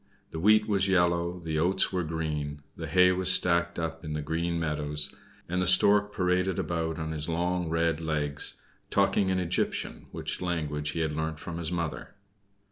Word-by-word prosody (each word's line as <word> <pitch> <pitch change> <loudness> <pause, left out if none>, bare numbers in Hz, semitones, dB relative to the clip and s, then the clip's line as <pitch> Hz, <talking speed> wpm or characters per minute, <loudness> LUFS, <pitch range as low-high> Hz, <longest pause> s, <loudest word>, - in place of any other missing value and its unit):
The 80 - -5
wheat 105 +4 +4
was 100 -2 +1
yellow, 85 -1 +2
the 80 -2 -2
oats 95 +4 +2
were 90 - +1
green, 75 -2 -3
the - - -6
hay 90 0 +5
was 90 0 +1
stacked 85 -1 +2
up 80 0 -4
in 75 -1 -4
the 75 -1 -3
green 85 +2 -1
meadows, 75 -2 -1 0.3
and 90 +1 -1
the 90 - +1
stork 100 +3 +5
paraded 90 -1 0
about 80 -1 -2
on 80 -1 -4
his 75 +1 -3
long 90 +1 -1
red 80 0 +1
legs, 75 -3 0 0.3
talking 95 -2 +2
in 95 - +1
Egyptian, 90 -1 -2
which - - -4
language 75 -4 -2
he 80 - -2
had 80 -2 -1
learnt 80 0 -2
from 85 +2 -6
his 85 0 -3
mother. 85 +1 -4
85 Hz, 180 wpm, -28 LUFS, 80-90 Hz, 0.3 s, hay